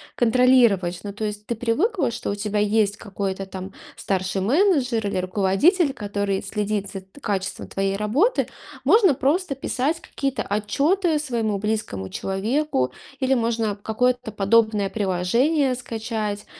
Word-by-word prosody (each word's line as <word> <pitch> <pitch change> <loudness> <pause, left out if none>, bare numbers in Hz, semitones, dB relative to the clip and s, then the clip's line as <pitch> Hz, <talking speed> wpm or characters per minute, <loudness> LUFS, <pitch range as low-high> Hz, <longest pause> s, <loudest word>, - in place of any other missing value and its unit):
контролировать. 235 -7 +4
Ну, 205 - -5
то 210 +2 -4
есть 210 0 -5
ты 235 - -1
привыкла, 270 - 0
что 230 - -4
у 200 - -1
тебя 210 0 -2
есть 205 0 +2
какой-то 195 -2 -4
там 190 0 -8 0.2
старший 190 0 -1
менеджер 260 - +2
или 200 - -1
руководитель, 195 - +2
который 200 -4 -2
следит 210 -2 -2
за 195 - -6
т 190 +9 -18
качеством 200 -6 -3
твоей 195 0 -1
работы. 270 - +1 0.4
Можно 410 -8 +5
просто 290 +4 0
писать 275 +4 -1
какие-то 275 -4 -3
отчеты 305 - +1
своему 235 -8 -1
близкому 205 - -3
человеку, 200 - -1 0.3
или 265 0 +2
можно, 230 -3 0
а, - - -4
какое-то 245 +3 -1
подобное 210 0 +2
приложение 230 - +1
скачать, 220 -4 -4
220 Hz, 135 wpm, -23 LUFS, 200-260 Hz, 0.4 s, Можно